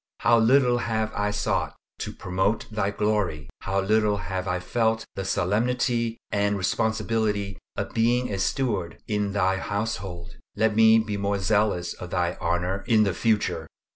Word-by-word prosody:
How 115 0 +5
little 125 +1 +4
have 110 -2 -1
I 105 0 0
sought 105 0 -1 0.2
to - - -4
promote 95 +4 -1
Thy 105 -2 0
glory. 100 -8 -1
How 95 +1 -1
little 105 +1 +2
have 95 +1 -4
I 90 -1 0
felt 110 +4 0
the 95 - -4
solemnity 115 +5 0
and 100 0 +1
responsibility 110 -1 -1 0.2
of - - -4
being 120 0 +1
a 95 - -2
steward 110 -4 -1
in 105 -2 -1
Thy 95 -1 +2
household! 95 -4 -4 0.2
Let 110 0 +2
me 110 0 +7
be 110 -2 -1
more 100 0 0
zealous 100 -3 +1
for 90 - -8
Thy 90 -1 -1
honor 90 +3 -1
in 110 -3 +5
the 100 -3 +1
future. 90 -6 0
105 Hz, 155 wpm, -25 LUFS, 95-110 Hz, 0.2 s, me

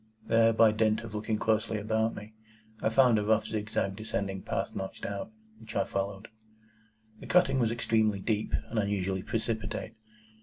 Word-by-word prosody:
There, 115 0 +4
by 110 -1 +5
dint 110 0 +2
of 115 -2 -9
looking 110 +1 -1
closely 110 0 +1
about 110 +2 0
me, 105 +1 -9 0.5
I - - +2
found 120 -1 +5
a - - -1
rough 110 +1 +2
zigzag 105 -3 -2
descending 100 -2 -3
path - - -3
notched 95 0 -5
out, 100 - -4 0.3
which - - -10
I - - +3
followed. 100 +2 -4 0.9
The - - -10
cutting 175 -7 +4
was 115 -3 +2
extremely 110 -3 +1
deep, 105 +1 -1 0.2
and 115 - 0
unusually 95 -2 -1
precipitate. 110 0 -3
110 Hz, 160 wpm, -30 LUFS, 105-115 Hz, 0.9 s, by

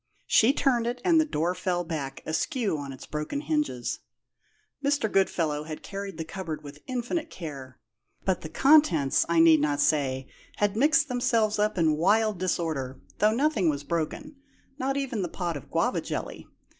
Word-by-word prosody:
She 225 +4 +5
turned 250 -5 +1
it, 245 +1 -2
and 330 -3 +5
the - - +1
door 170 - 0
fell 180 -1 -1
back, 145 -5 -5
askew 215 - -1
on 140 -2 -5
its 130 0 -10
broken 150 - -4
hinges. 300 - -1 0.8
Mr. 280 -6 +1
Goodfellow 160 -6 +1
had 155 -1 -7
carried 195 -3 -6
the 160 - -4
cupboard 165 -2 -6
with 145 +1 -11
infinite 260 +6 -2
care, 140 - -8 0.5
but 190 -2 +1
the 155 - -7
contents, 175 - +4
I 170 -1 +3
need 165 -1 +7
not 145 -1 0
say, 135 -3 +1 0.3
had 205 -1 0
mixed 305 +5 +4
themselves 230 -4 +1
up 210 -1 +1
in 160 -3 +3
wild 210 +3 +2
disorder, 160 -8 -2 0.2
though 215 +1 +3
nothing 265 - +2
was 145 -1 -2
broken 170 - -3 0.4
not 270 +1 -1
even 265 -6 -2
the 175 - -2
pot 175 -1 -3
of 140 - -9
guava - - 0
jelly. - - -5
185 Hz, 170 wpm, -27 LUFS, 155-245 Hz, 0.8 s, need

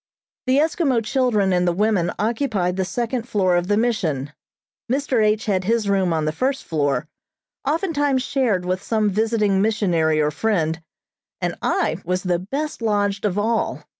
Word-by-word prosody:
The 260 +1 +3
Eskimo 290 -6 +1
children 215 -7 +1
and 180 0 +2
the - - +3
women 195 -1 +1
occupied 215 -5 0
the 190 0 -1
second 240 +4 -3
floor 185 -4 +2
of 175 0 0
the 205 +1 +2
mission. 160 - -1 0.6
Mr. 265 -4 +1
H. 215 +3 +1
had 190 -4 0
his 225 0 +1
room 190 -3 +2
on 160 -2 0
the 155 - +1
first 265 - -1
floor, 150 -1 -1 0.6
oftentimes 290 -5 +1
shared 230 -11 0
with 185 +1 -1
some 215 -2 0
visiting 210 -2 +1
missionary 175 -8 +1
or 150 0 +2
friend, 165 -4 0 0.6
and - - -1
I - - 0
was 180 +1 -1
the 180 -2 0
best 275 - -4
lodged 205 -2 0
of 200 -2 0
all. 225 +2 0
210 Hz, 165 wpm, -22 LUFS, 180-235 Hz, 0.6 s, The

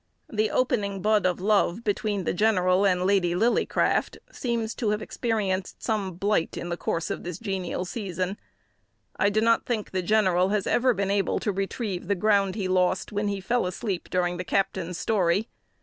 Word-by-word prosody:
The 215 0 +1
"opening 200 -7 0
bud 210 -2 +3
of 180 - -1
love" 205 +1 +2
between 205 -2 -1
the - - -1
general 185 -1 +3
and 180 -1 +1
Lady 185 -3 +2
Lillycraft 230 +6 +1
seems 235 - -2
to 225 -5 -1
have 210 0 0
experienced 210 -5 -2
some 205 -5 -1
blight 200 -1 0
in 175 - -5
the 170 - -1
course 165 -1 -2
of - - -3
this 175 -1 -5
genial 190 -4 -3
season. 185 -1 -3 0.8
I 200 - +3
do 215 +1 +1
not 230 0 +2
think 225 -4 -2
the 185 - -1
general 185 -2 +3
has 205 -1 0
ever 250 -1 +2
been 200 0 -1
able 200 -1 +1
to 210 - 0
retrieve 195 -1 -3
the 200 - +2
ground 200 -1 +2
he 200 -4 -2
lost 185 0 +1
when 205 0 -1
he 200 -1 -1
fell 235 +2 0
asleep 185 0 -4
during 175 -1 0
the 180 - -3
captain's 185 -2 -1
story. 200 0 +1
195 Hz, 180 wpm, -26 LUFS, 185-215 Hz, 0.8 s, bud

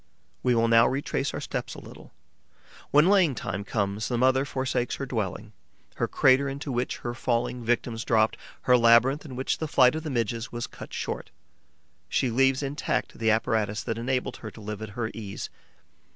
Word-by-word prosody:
We 125 -1 +2
will 115 0 +3
now 115 0 +6
retrace 135 0 -1
our - - -4
steps - - -4
a - - -8
little. - - -13 0.8
When 150 +4 +5
laying 185 -8 +4
time 95 -2 -4
comes, 100 0 -2
the 120 - -1
mother 130 +2 +3
forsakes 130 -2 -1
her 140 - -4
dwelling, 110 -3 -4 0.4
her - - 0
crater 135 +2 +4
into 140 +1 -5
which 125 0 -1
her 120 - -2
falling 120 0 -1
victims 115 0 -1
dropped, 110 -1 +2 0.3
her 125 - +4
labyrinth 120 +5 +5
in 130 -4 -8
which 130 +1 -1
the 160 - -2
flight 130 -3 +5
of 160 - -3
the 155 - -5
Midges 115 -2 -2
was 120 0 -3
cut - - -11
short; - - -4 0.8
she 130 - +1
leaves 135 +3 +3
intact 140 -3 -2
the 110 -1 +2
apparatus 110 -1 +1
that 115 0 -3
enabled 125 +2 -1
her 110 - -7
to 110 - -14
live 105 0 -6
at 110 - -5
her 110 -2 -2
ease. 100 -3 -6
120 Hz, 185 wpm, -27 LUFS, 110-135 Hz, 0.8 s, now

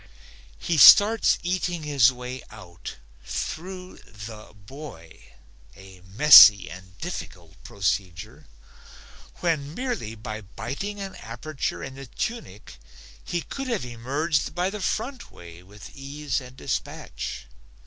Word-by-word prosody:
He 160 - -1
starts 215 +9 +8
eating 175 -2 -2
his 140 -4 +4
way 125 0 -7
out 90 -6 -10 0.3
through 180 - -6
the 105 0 -11
boy, 100 - -12 0.5
a 95 -1 -15
messy 105 - +8
and 90 +1 -13
difficult 90 - -8
procedure, 95 -6 -3 0.9
when 155 -3 -1
merely 245 - -4
by 110 -1 -7
biting 140 - -6
an 195 -1 -6
aperture 130 +5 -5
in 135 - -7
the 135 0 -10
tunic 120 - -6 0.4
he 175 - -3
could 270 -1 -6
have 230 - -2
emerged 140 +6 -2
by 180 +2 0
the 210 0 -6
front 245 +6 -3
way 85 0 -13
with 100 +8 -14
ease 145 +1 -4
and 125 0 -13
dispatch. 65 - -5
130 Hz, 120 wpm, -25 LUFS, -, 0.9 s, starts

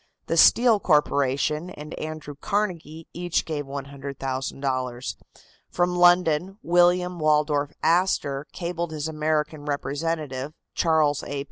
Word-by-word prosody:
The - - -1
Steel 235 -3 +6
Corporation 150 0 +1
and 150 -3 -9
Andrew 155 -1 -6
Carnegie 165 -2 -3
each 175 -1 -1
gave 150 -3 -3
$100,000. 135 -2 -4 0.5
From 180 0 0
London 175 +1 +3
William 175 +1 +3
Waldorf 150 -1 +1
Astor 160 -5 +1
cabled 170 -2 -4
his 155 0 -3
American 155 -1 -1
representative, 145 -1 -3 0.2
Charles 155 -3 +2
A. 140 0 -5
155 Hz, 105 wpm, -25 LUFS, 145-175 Hz, 0.5 s, Steel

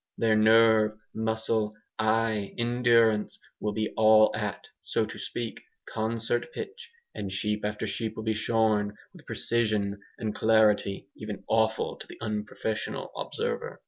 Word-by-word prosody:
Their 110 -1 +3
nerve, 110 0 +5 0.2
muscle, 110 -1 0 0.2
eye, 110 -2 +1
endurance, 120 -2 +3 0.2
will 105 0 -2
be 110 0 -2
all 110 0 +6
at, 105 -2 -3 0.2
so - - 0
to - - -9
speak, 120 -2 -5 0.3
concert 115 +4 -1
pitch, 460 +3 -7 0.2
and 100 -2 -5
sheep 105 +2 -1
after 105 0 -2
sheep 110 -2 -3
will 110 - -5
be 110 0 +1
shorn 110 -2 +1 0.2
with - - -14
a - - -28
precision 105 -4 0 0.2
and 110 -2 -3
celerity 105 -3 +3
even 105 -2 -7
awful 110 0 +1
to - - -10
the - - -11
unprofessional 110 0 -3
observer. - - -3
110 Hz, 140 wpm, -28 LUFS, 105-115 Hz, 0.3 s, all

